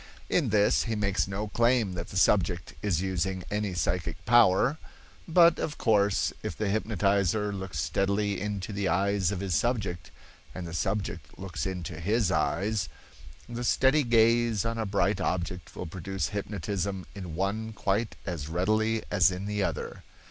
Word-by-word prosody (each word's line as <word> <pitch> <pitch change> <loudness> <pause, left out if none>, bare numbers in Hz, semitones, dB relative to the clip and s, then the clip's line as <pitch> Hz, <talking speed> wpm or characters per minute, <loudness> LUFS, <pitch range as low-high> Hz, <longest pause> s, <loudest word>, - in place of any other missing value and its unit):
In 150 -9 +2
this 105 0 +3
he 115 - -1
makes 100 -3 0
no 100 +2 -3
claim 115 -3 +2
that 85 -1 -5
the 95 - -5
subject 85 -6 +2
is 95 -4 0
using 95 0 -1
any 105 -3 -1
psychic 85 0 -1
power; 120 +5 +4 0.5
but, 170 0 +5
of 145 - -3
course, 105 -3 +2
if - - -5
the 105 -2 -1
hypnotizer 100 -1 +1
looks 95 -6 -5
steadily 100 +8 0
into 105 0 -3
the 100 -1 -1
eyes 95 +2 +1
of 95 -2 -3
his 95 -2 -2
subject, 90 - -1 0.5
and 90 - -5
the 85 - -7
subject 90 -5 -3
looks 95 -3 -4
into 90 -3 -5
his 105 +2 +1
eyes, 100 -3 0 0.6
the 120 0 -5
steady 135 +4 +4
gaze 115 -3 +3
on 115 0 -2
a 110 - -1
bright 100 0 +1
object 90 0 -3
will - - -5
produce 90 -2 -3
hypnotism 100 -1 -3
in 90 -5 -7
one 105 +5 -2
quite 105 +1 -1
as 80 -5 -4
readily 110 +6 +1
as 95 -4 +5
in 95 +1 -5
the 105 0 -1
other. 85 -6 -3
100 Hz, 160 wpm, -28 LUFS, 90-110 Hz, 0.6 s, but